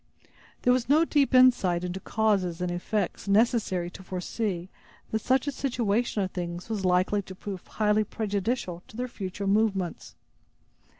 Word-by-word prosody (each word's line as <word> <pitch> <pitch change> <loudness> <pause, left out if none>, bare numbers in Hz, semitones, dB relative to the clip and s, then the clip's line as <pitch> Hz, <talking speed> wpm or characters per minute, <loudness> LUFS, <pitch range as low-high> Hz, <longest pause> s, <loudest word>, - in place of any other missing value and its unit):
There 250 - +5
was 250 -1 -1
no 310 +3 +5
deep 290 -4 +2
insight 220 -9 +5
into 180 +1 -3
causes 195 -6 0
and 180 -1 -1
effects 185 +3 -2
necessary 200 -4 +2
to 190 - -11
foresee 185 0 -3 0.4
that 220 - 0
such 260 +4 +2
a 285 - -1
situation 235 -5 0
of 185 - -3
things 175 +1 -5
was 215 -3 -2
likely 185 +3 +2
to 190 -1 -10
prove 190 -1 -7
highly 215 0 +2
prejudicial 205 -3 -2
to 215 - -13
their 250 +1 -2
future 200 -4 -5
movements. 195 -3 0
205 Hz, 155 wpm, -27 LUFS, 180-230 Hz, 0.4 s, There